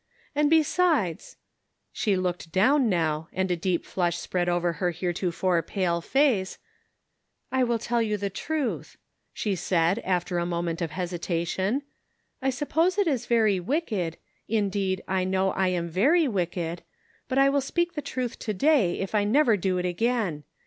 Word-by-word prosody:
And 295 0 +2
besides 315 - +1 0.2
" - - -51
— - - -52
she 205 -4 0
looked 180 -2 -3
down, 245 - +3
now, 160 -3 0
and 190 0 -1
a - - +2
deep 175 0 -1
flush 175 -2 -1
spread 175 0 -1
over 175 0 +1
her 175 +3 -1
heretofore 175 0 0
pale 170 0 -1
face 245 - +1 0.5
— - - -50
"I 260 -1 +2
will 240 -1 +1
tell 235 +1 -1
the 210 -3 -1
truth," 290 +6 -3 0.3
she 210 - -2
said, 175 +2 +1
after 180 -2 -1
a 170 - -1
moment 170 0 -2
of 170 - -1
hesitation: 180 - -2 0.3
" - - -47
I 265 - +1
suppose 320 +8 +1
it 405 - +3
is 275 -8 -1
very 220 -5 +3
wicked 200 - -2 0.2
— - - -43
indeed, 200 -3 0
I 190 0 0
know 190 +1 +1
I 190 -1 +1
am 175 -2 -1
very 280 - +3
wicked 175 -5 -2 0.2
— - - -36
but 260 - -1
I 275 0 +6
will 280 0 +2
speak 345 +6 -1
the 295 - -3
truth 255 -4 -4
to 215 -3 -3
day, 260 - +3
if 195 +1 -4
I 210 -1 +3
never 235 +2 +4
do 185 -1 0
it 180 - -1
again. 180 -4 -1
190 Hz, 175 wpm, -26 LUFS, 175-255 Hz, 0.5 s, I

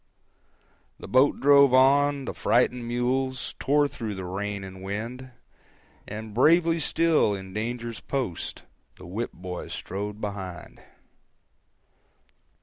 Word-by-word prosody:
370.jpg - - -40
(53K) - - -21
The - - -8
boat 130 +3 +4
drove 140 -1 +6
on, 140 +1 +4
the - - -4
frightened 120 0 +1
mules 130 +2 -1
Tore 145 +1 +3
through 110 -6 -5
the 95 -1 -6
rain 100 +2 -4
and 95 -1 -9
wind, 115 +7 -5 0.8
And 110 +1 -7
bravely 165 +7 +4
still, 160 -9 +2
in 95 -1 -9
danger's 115 +1 -4
post, 130 - -4 0.3
The 90 - -13
whip 105 +7 -4
boy 90 0 -7
strode 105 +2 -5
behind. 95 -5 -7
120 Hz, 125 wpm, -26 LUFS, 100-135 Hz, 0.8 s, drove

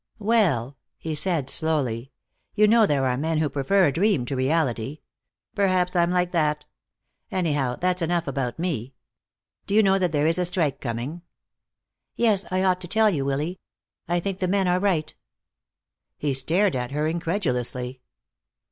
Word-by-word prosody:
"Well," 175 - +1 0.2
he 160 - -5
said 155 -3 0
slowly, 135 -6 -1 0.4
"you 210 0 +5
know 225 0 +5
there 140 -2 +1
are 125 -1 0
men 160 +3 -1
who 155 -1 +1
prefer 180 +8 +2
a 145 - +2
dream 175 - +1
to 135 - -3
reality. 135 -1 -1 0.5
Perhaps 185 -2 +1
I'm 170 -1 +3
like 180 0 +1
that. 150 -3 0 0.6
Anyhow, 145 -9 0
that's 180 +3 0
enough 170 0 0
about 130 -6 -3
me. 140 -8 -3 0.7
Do 200 - -1
you 220 - +6
know 195 -1 +3
that 180 -3 0
there 150 -1 +1
is 165 +2 +2
a 180 - +1
strike 170 -6 0
coming?" 125 +7 -4 0.9
"Yes. 215 -5 +2
I 185 0 0
ought 185 -1 +2
to 175 - -7
tell 215 +3 +3
you, 145 -7 -1
Willy. 150 +6 -2 0.5
I 175 +1 +1
think 195 +1 -4
the 185 - 0
men 195 0 +1
are 180 0 +2
right." 185 -6 0 1.0
He 145 -2 -1
stared 170 +8 +2
at 125 -1 -2
her 150 +3 -1
incredulously. 130 - -2
165 Hz, 165 wpm, -24 LUFS, 135-185 Hz, 1.0 s, you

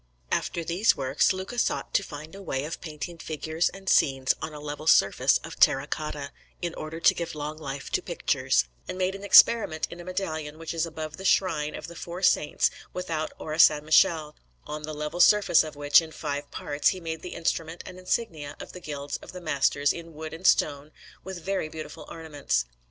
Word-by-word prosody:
After 170 - -1
these 175 +7 +2
works, 135 0 +2
Luca 190 +6 -4
sought - - -1
to - - +4
find 155 -3 -9
a 195 - -9
way 135 -7 -2
of 165 - -6
painting 165 +1 -7
figures 160 +1 -1
and 195 0 -13
scenes 135 -6 +3
on 155 - -4
a 150 - -8
level 150 +1 -6
surface 100 -10 +5
of - - -9
terra 135 +1 +5
cotta, 150 -2 -4 0.3
in 175 -1 -3
order 155 +1 -6
to - - +5
give 170 -2 -5
long 150 +1 -5
life 140 -2 -6
to - - +1
pictures, 60 - +1 0.2
and - - -5
made 185 0 0
an 195 +1 -8
experiment 200 -5 +6
in 170 - -9
a - - -8
medallion 160 -5 -4
which 165 +1 -5
is 165 0 0
above 155 -1 -6
the 190 - -8
shrine 160 -6 +2
of - - -7
the 170 - -10
four 175 +3 -7
saints 150 - +3 0.2
without 165 -4 -3
Orsanmichele, 155 0 +4 0.3
on 150 0 -5
the 155 +1 -6
level 150 +3 -4
surface 205 -2 +6
of 155 -1 -8
which, 145 +2 +5
in 160 -1 -9
five 145 -2 -4
parts, 145 0 -1
he 185 - -3
made 160 -2 -5
the 180 - -7
instruments 165 0 -2
and 185 -1 -9
insignia 160 -7 -2
of - - -8
the 180 - -9
Guilds 145 -2 -5
of - - -12
the 180 - -7
Masters 145 -3 +1
in 165 -2 -9
Wood 155 +1 -7
and 165 +4 -1
Stone, 145 0 +2 0.3
with 190 -2 -7
very 190 -5 -1
beautiful 155 0 -8
ornaments. 145 - -2
155 Hz, 200 wpm, -27 LUFS, 150-175 Hz, 0.3 s, experiment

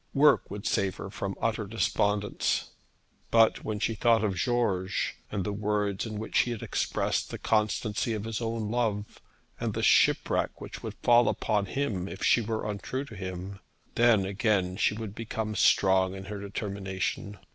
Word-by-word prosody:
Work 145 +1 +5
would 100 +1 -7
save 95 -1 +1
her 100 - -7
from 95 -1 -4
utter 110 -2 -1
despondence. 105 -1 0 0.6
But 115 -1 +4
when 110 -1 -2
she 115 - 0
thought 115 0 +3
of 105 -3 +1
George, 100 -3 0
and 100 - -1
the 105 - -2
words 105 0 -1
in 110 -1 -5
which 110 - 0
he - - +2
had 120 -3 -4
expressed - - -1
the - - -5
constancy 110 +1 0
of 105 -2 -3
his 115 0 -4
own 115 -2 -2
love, 110 -4 -2 0.4
and - - -2
the - - -2
shipwreck - - +3
which - - -8
would - - -6
fall 120 -1 +6
upon 105 -3 0
him 100 -5 -2
if 95 - -7
she 120 - +4
were 110 -1 -3
untrue 115 +6 -3
to 115 - -11
him, 95 0 -6 0.3
then 115 -5 +4
again 95 -2 +1
she 105 - +1
would 110 -2 -6
become 110 -1 -4
strong 95 -2 +3
in 95 0 -8
her 105 +1 -6
determination. 100 0 -4
105 Hz, 170 wpm, -28 LUFS, 100-115 Hz, 0.6 s, fall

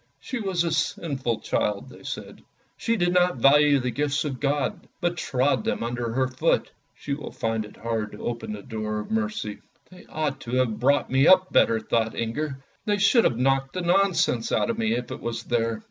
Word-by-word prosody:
" - - -45
She 260 - -2
was 190 -5 0
a 170 - -1
sinful 150 -6 -1
child," 105 -1 -1
they - - -14
said. - - -7 0.2
" - - -40
She 230 - 0
did 175 -4 +1
not 180 -4 +3
value 145 +3 +5
the 125 -1 -2
gifts 145 +2 0
of 135 -4 -4
God, 145 +6 -1
but 175 0 0
trod 135 -3 +1
them - - -1
under 120 +2 -1
foot. 130 0 0 0.2
She 140 - -4
will 145 0 -6
find 115 -1 -2
it 105 - -14
hard 110 -2 -3
to - - -8
open 115 -2 -3
the 105 -1 -8
door 110 -1 -3
of - - -10
mercy." 215 - -2 0.3
"They 180 - -15
ought 150 -4 -2
to 125 -1 -4
have 125 -4 +1
brought 140 +2 +2
me 135 +3 +4
up 185 0 +5
better!" 115 - +4
thought 110 0 0
Inger; 135 +5 -2
" - - -39
they 205 -1 +2
should 205 +4 +4
have 115 - +2
knocked 135 +1 +1
the 185 - -2
nonsense 175 -9 +2
out - - +2
of 230 - -5
me 225 0 +1
if 125 - -3
it - - -5
was 115 -1 -4
there." 115 -2 0
135 Hz, 215 wpm, -25 LUFS, 115-170 Hz, 0.3 s, value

